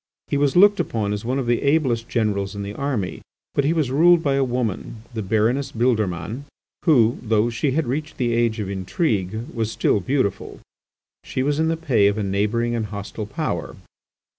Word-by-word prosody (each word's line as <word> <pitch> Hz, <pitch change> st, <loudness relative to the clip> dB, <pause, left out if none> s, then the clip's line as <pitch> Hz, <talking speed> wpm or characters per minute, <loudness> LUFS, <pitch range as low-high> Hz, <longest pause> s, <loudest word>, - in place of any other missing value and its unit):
He -, -, 0 dB
was 140 Hz, -1 st, +1 dB
looked 205 Hz, +3 st, +6 dB
upon 105 Hz, -3 st, -1 dB
as 105 Hz, -, -4 dB
one 125 Hz, +3 st, -1 dB
of 135 Hz, -, -1 dB
the 120 Hz, 0 st, +1 dB
ablest 135 Hz, -6 st, +1 dB
generals 100 Hz, -4 st, -1 dB
in 100 Hz, -, -4 dB
the 100 Hz, +1 st, -5 dB
army, 125 Hz, -8 st, -3 dB, 0.3 s
but 140 Hz, -, +1 dB
he 145 Hz, -, +2 dB
was 155 Hz, -6 st, 0 dB
ruled 170 Hz, +4 st, +5 dB
by 140 Hz, -, +2 dB
a 135 Hz, 0 st, +2 dB
woman, 120 Hz, -3 st, -3 dB
the 110 Hz, -, -3 dB
Baroness 115 Hz, +7 st, +1 dB
Bildermann, 110 Hz, +1 st, -1 dB, 0.4 s
who, 120 Hz, -7 st, +4 dB
though 115 Hz, 0 st, +1 dB
she 130 Hz, +4 st, 0 dB
had 160 Hz, +1 st, +1 dB
reached 150 Hz, +5 st, -3 dB
the 120 Hz, -3 st, 0 dB
age 115 Hz, -1 st, +1 dB
of 105 Hz, -, -3 dB
intrigue, 100 Hz, -, -2 dB
was 115 Hz, -2 st, -2 dB
still 105 Hz, -, +1 dB
beautiful. 100 Hz, -3 st, -2 dB, 0.6 s
She 130 Hz, -, -2 dB
was 145 Hz, +2 st, 0 dB
in 160 Hz, -, +2 dB
the 165 Hz, 0 st, 0 dB
pay 125 Hz, -11 st, +3 dB
of 100 Hz, +1 st, +1 dB
a 105 Hz, -, -1 dB
neighbouring 105 Hz, +5 st, 0 dB
and 115 Hz, -2 st, -2 dB
hostile 100 Hz, +1 st, -6 dB
Power. 105 Hz, -, -3 dB
120 Hz, 190 wpm, -22 LUFS, 105-140 Hz, 0.6 s, looked